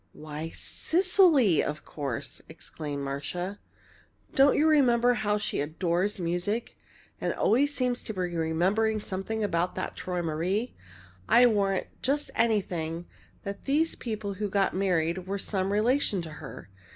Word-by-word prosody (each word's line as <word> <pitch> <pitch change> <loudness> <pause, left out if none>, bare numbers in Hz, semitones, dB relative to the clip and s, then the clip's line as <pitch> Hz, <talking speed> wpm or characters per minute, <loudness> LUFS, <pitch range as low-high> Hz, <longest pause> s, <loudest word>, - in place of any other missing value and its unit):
"Why, 155 +1 -6
Cecily, 335 - +3
of 150 +1 -4
course!" 140 -6 -5
exclaimed 145 -2 -6
Marcia. 175 +8 -4 0.7
"Don't 275 +1 +5
you 310 - +4
remember 245 -5 +4
how 210 -2 0
she 210 - -1
adores 175 +6 -1
music 180 +7 -2 0.5
and - - -1
always 285 +6 +2
seems 250 -2 0
to 220 - -4
be - - -5 0.2
remembering 185 +7 +1
something 205 +3 -3
about 180 -2 0
that - - -4
'Träumerei'? 180 +5 -2 0.6
I'll 245 +1 +7
warrant 195 -2 +1 0.2
just 290 +3 0
anything 175 -7 0 0.4
that 200 0 -6
these 310 +4 +2
people 215 -4 -4
who 205 +1 -3
got 195 0 +1
married 180 -1 0
were 200 +1 -2
some 195 -1 -1
relation 215 -2 +2
to 165 - -7
her! 150 -8 -10
195 Hz, 135 wpm, -28 LUFS, 170-235 Hz, 0.7 s, I'll